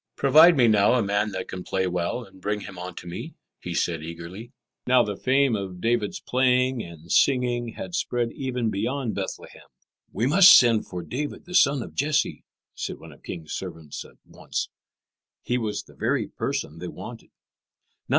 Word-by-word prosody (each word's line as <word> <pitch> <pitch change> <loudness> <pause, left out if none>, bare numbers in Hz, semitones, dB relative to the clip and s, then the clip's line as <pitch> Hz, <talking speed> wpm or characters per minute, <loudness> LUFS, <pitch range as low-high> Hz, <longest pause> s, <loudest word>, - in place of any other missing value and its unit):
"Provide 155 +4 +6
me 120 -3 +5
now 105 -1 +4
a 120 - +2
man 100 +1 0
that 95 -2 -5
can 90 -1 -6
play 95 -1 -1
well, 90 +7 -2
and 95 -3 -17
bring 105 +2 -2
him 95 -3 -9
unto 90 0 -7
me," 85 +1 -7 0.2
he 90 -1 -5
said 85 -2 0
eagerly. 85 +8 -8 0.4
Now 125 -1 +5
the 105 -2 -3
fame 130 +2 +2
of 95 -3 -5
David's 115 +1 0
playing 125 -1 +2
and 85 -2 -10
singing 120 -3 +2
had 190 -2 -7
spread 120 -8 -1
even 125 -4 -2
beyond 120 +4 -2
Bethlehem. - - -7 0.4
"We 110 +5 -1
must 185 +7 +9
send 115 -3 +3
for 90 -2 -6
David, 140 - -5
the 180 - -10
son 140 -6 +4
of - - -11
Jesse," 150 +2 0 0.3
said - - -4
the - - -14
king's 80 -3 -7
servants 80 -5 -6
at - - -18
once. - - -5 0.7
He 125 +1 0
was 110 -3 -3
the - - -18
very - - -1
person 80 +3 -4
they 90 - -5
wanted. - - -9
110 Hz, 170 wpm, -25 LUFS, 90-130 Hz, 0.7 s, must